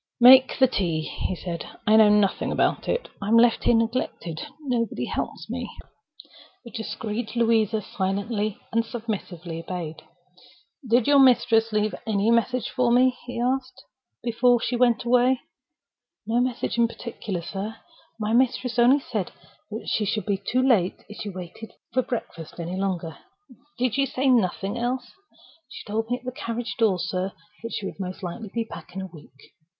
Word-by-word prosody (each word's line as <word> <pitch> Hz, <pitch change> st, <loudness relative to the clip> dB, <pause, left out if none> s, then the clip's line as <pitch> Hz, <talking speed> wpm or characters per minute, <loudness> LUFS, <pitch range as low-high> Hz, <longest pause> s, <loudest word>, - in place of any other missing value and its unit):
"Make 255 Hz, +2 st, +8 dB
the 265 Hz, -, +6 dB
tea," 175 Hz, -10 st, 0 dB
he 185 Hz, -, -3 dB
said. 170 Hz, -1 st, -5 dB, 0.2 s
"I 215 Hz, 0 st, +5 dB
know 220 Hz, -1 st, +7 dB
nothing 205 Hz, -2 st, +2 dB
about -, -, +1 dB
it. -, -, -1 dB
I'm 215 Hz, +3 st, +3 dB
left 235 Hz, 0 st, +4 dB
here 240 Hz, -, +5 dB
neglected. 225 Hz, -8 st, -1 dB, 0.2 s
Nobody 245 Hz, -5 st, -1 dB
helps -, -, -4 dB
me." -, -, -4 dB, 1.0 s
The 235 Hz, -, -10 dB
discreet 220 Hz, 0 st, -4 dB
Louisa 225 Hz, -2 st, +2 dB
silently 205 Hz, +3 st, -2 dB
and 230 Hz, 0 st, +2 dB
submissively 190 Hz, -8 st, -5 dB
obeyed. 165 Hz, -2 st, -6 dB, 0.9 s
"Did 235 Hz, 0 st, +4 dB
your 285 Hz, -1 st, +5 dB
mistress 235 Hz, -3 st, +5 dB
leave 210 Hz, 0 st, +1 dB
any 215 Hz, +1 st, +2 dB
message 240 Hz, +2 st, +1 dB
for 250 Hz, -2 st, +2 dB
me," 250 Hz, +1 st, +4 dB
he 245 Hz, -, -4 dB
asked, 255 Hz, +1 st, -1 dB, 0.4 s
"before 240 Hz, +1 st, +3 dB
she 245 Hz, -, -1 dB
went 240 Hz, -1 st, +3 dB
away?" 250 Hz, +1 st, +3 dB, 0.9 s
"No 230 Hz, +2 st, +1 dB
message 245 Hz, -1 st, -1 dB
in 235 Hz, -, +5 dB
particular, 215 Hz, -6 st, -6 dB
sir. 195 Hz, +5 st, -5 dB, 0.4 s
My 215 Hz, +1 st, -1 dB
mistress 250 Hz, -1 st, +2 dB
only 255 Hz, +4 st, +6 dB
said 215 Hz, -8 st, -3 dB, 0.5 s
she 215 Hz, -, 0 dB
should 215 Hz, +1 st, -1 dB
be 200 Hz, -2 st, -1 dB
too 255 Hz, +1 st, +1 dB
late 195 Hz, -8 st, +2 dB
if 210 Hz, -, -9 dB
she 210 Hz, -, -4 dB
waited 185 Hz, +4 st, -9 dB, 0.2 s
breakfast 235 Hz, -11 st, -3 dB
any 170 Hz, +2 st, -4 dB
longer." 185 Hz, -4 st, -3 dB, 0.6 s
"Did 250 Hz, -2 st, 0 dB
she 275 Hz, +2 st, +2 dB
say 265 Hz, +1 st, 0 dB
nothing 200 Hz, -3 st, +1 dB
else?" 245 Hz, +1 st, -2 dB, 0.6 s
"She -, -, -10 dB
told 225 Hz, +2 st, -2 dB
me 245 Hz, -, 0 dB
at 250 Hz, -, -19 dB
the 255 Hz, -, -3 dB
carriage 230 Hz, -3 st, -4 dB
door, 215 Hz, -5 st, +3 dB
sir, 185 Hz, +2 st, -2 dB, 0.3 s
that 230 Hz, 0 st, -6 dB
she 200 Hz, -, -3 dB
would 195 Hz, -, -6 dB
most 185 Hz, 0 st, -5 dB
likely 195 Hz, +5 st, -5 dB
be 230 Hz, -, -1 dB
back 225 Hz, -, -11 dB
in 190 Hz, -, -3 dB
a -, -, -4 dB
week." 145 Hz, -4 st, -15 dB
225 Hz, 165 wpm, -25 LUFS, 195-245 Hz, 1.0 s, Make